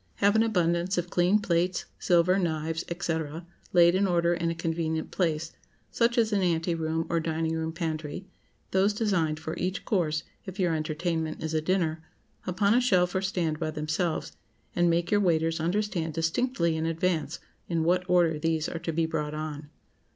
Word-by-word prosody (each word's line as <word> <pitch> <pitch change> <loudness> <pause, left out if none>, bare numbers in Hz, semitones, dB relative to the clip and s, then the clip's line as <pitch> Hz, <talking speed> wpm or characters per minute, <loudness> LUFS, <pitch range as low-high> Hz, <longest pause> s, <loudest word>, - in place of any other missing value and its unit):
Have 200 +1 +3
an 220 - +5
abundance 180 -4 +1
of 175 0 -2
clean 180 +4 +4
plates, 180 -2 0
silver, 180 +2 +3
knives, 160 -1 -1 0.2
&c., 165 -1 0 0.5
laid 175 -1 +6
in 195 +2 +2
order 170 -1 +2
in 170 -1 -1
a 165 - -2
convenient 165 -1 -2
place,—such 170 +8 -2
as 225 -2 +3
an 200 - +2
ante 170 -1 +1
room, 160 0 -1
or 170 - +1
dining 160 0 -1
room 160 0 -2
pantry,—those 175 +4 -3
designed 175 -8 0
for 160 0 -5
each 185 +2 -2
course, 160 -6 0 0.2
if 190 0 -9
your 175 -3 +2
entertainment 160 +1 -2
is 160 0 -3
a 155 - +1
dinner, 165 -2 0 0.5
upon 200 +3 +2
a 245 - +4
shelf 180 -8 +3
or 190 - 0
stand 175 -5 -1
by 160 -2 -1
themselves, 155 +2 -2 0.4
and 175 0 +3
make 170 +1 +1
your 205 -1 +4
waiters 165 -3 +1
understand 175 -2 -1
distinctly 170 +1 0
in 160 +1 -1
advance 165 -2 -1 0.3
in 165 -2 +1
what 180 +2 +2
order 170 -3 +3
these 160 0 0
are 165 - -4
to 165 0 -3
be 165 +1 +1
brought 150 -2 -3
on. 150 -1 -5
170 Hz, 175 wpm, -28 LUFS, 160-185 Hz, 0.5 s, laid